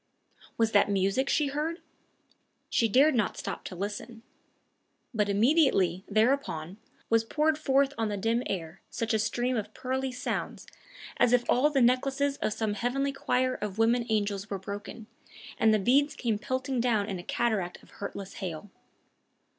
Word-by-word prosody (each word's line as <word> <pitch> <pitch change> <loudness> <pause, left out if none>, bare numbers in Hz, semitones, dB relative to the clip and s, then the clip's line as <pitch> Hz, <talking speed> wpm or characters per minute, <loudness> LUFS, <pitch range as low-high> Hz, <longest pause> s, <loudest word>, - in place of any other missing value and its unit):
Was 225 -1 +2
that 205 -1 +4
music 200 +7 +1
she 295 -2 +2
heard? 310 +5 -2 0.9
She 230 - +2
dared 280 +8 +5
not 230 -5 0
stop - - -5
to - - -6
listen. 215 +4 -6 0.9
But 210 -3 +1
immediately, 200 - +3
thereupon, 215 - 0 0.3
was 225 0 +4
poured 305 +6 +1
forth 280 -2 +2
on 225 -1 0
the 205 - -2
dim 225 +4 +1
air 170 -2 -5
such 230 0 -2
a 220 - +2
stream 245 +3 0
of 215 -1 -4
pearly 260 +1 -2
sounds 250 0 -4 0.5
as 245 - +4
if 245 -1 +3
all 270 +5 +4
the 275 -3 +1
necklaces 275 +3 +2
of - - -1
some 215 -1 -1
heavenly 270 +6 -1
choir 255 -1 0
of 210 -4 -5
woman 230 +1 +2
angels 205 -2 -1
were 200 - -2
broken, 205 +3 -7 0.5
and 220 - +5
the 215 - +4
beads 270 +8 +2
came 225 -4 -1
pelting 260 +1 -2
down 230 -4 +2
in 195 -4 -4
a - - -8
cataract 195 -5 -1
of - - -20
hurtless 200 -1 -7
hail. 185 +2 -5
230 Hz, 160 wpm, -28 LUFS, 205-260 Hz, 0.9 s, dared